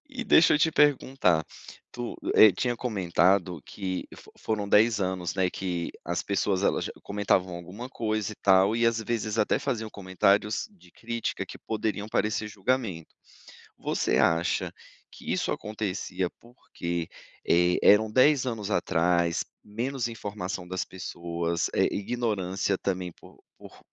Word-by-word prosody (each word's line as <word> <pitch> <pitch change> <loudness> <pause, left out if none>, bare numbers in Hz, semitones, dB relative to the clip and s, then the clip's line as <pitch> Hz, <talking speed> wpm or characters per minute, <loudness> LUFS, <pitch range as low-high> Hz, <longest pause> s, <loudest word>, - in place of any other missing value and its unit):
E 250 - -3
deixa 165 - +6
eu 150 - +3
te 160 +1 +3
perguntar. 130 - +3 0.5
Tu, 120 -1 -5 0.2
eh, 110 -2 +9
tinha 120 +6 -1
comentado 95 - +1
que 95 -2 -4
fo - - -16
foram 105 -2 -2
10, 110 0 +4
anos, 90 -2 -2
né, 95 -1 +2
que 90 -3 -3 0.2
as 85 +2 -1
pessoas 100 -1 0
elas - - +1
já - - -4
comentavam 95 -3 0
alguma 95 +9 -8
coisa, 110 -4 -2
e - - -9
tal, 95 +2 +4
e 115 0 +2
às 115 -1 +2
vezes 110 -1 -2
até 105 - +2
faziam 115 -5 -2
comentários 100 - +1
de 195 - -21
crítica, 115 0 -4
que - - -9
poderiam 105 -1 -3
parecer 105 0 0
julgamento. 105 -5 -2 0.7
Você - - 0
acha 85 +2 +1 0.4
que - - -5
isso - - 0
acontecia 100 -3 -3
porque, 85 -8 -5 0.4
eh, 90 +1 +4
eram 105 +1 +6
10 130 +3 +4
anos 110 -4 -3
atrás? 85 -1 +1 0.2
Menos 120 +4 -3
informação 100 -4 -5
das 95 +1 -3
pessoas? 85 -2 -3
Eh, - - +3
ignorância 100 -4 -1
também, 90 -3 -3
por - - -18 0.2
por - - -14
100 Hz, 145 wpm, -27 LUFS, 90-115 Hz, 0.7 s, eh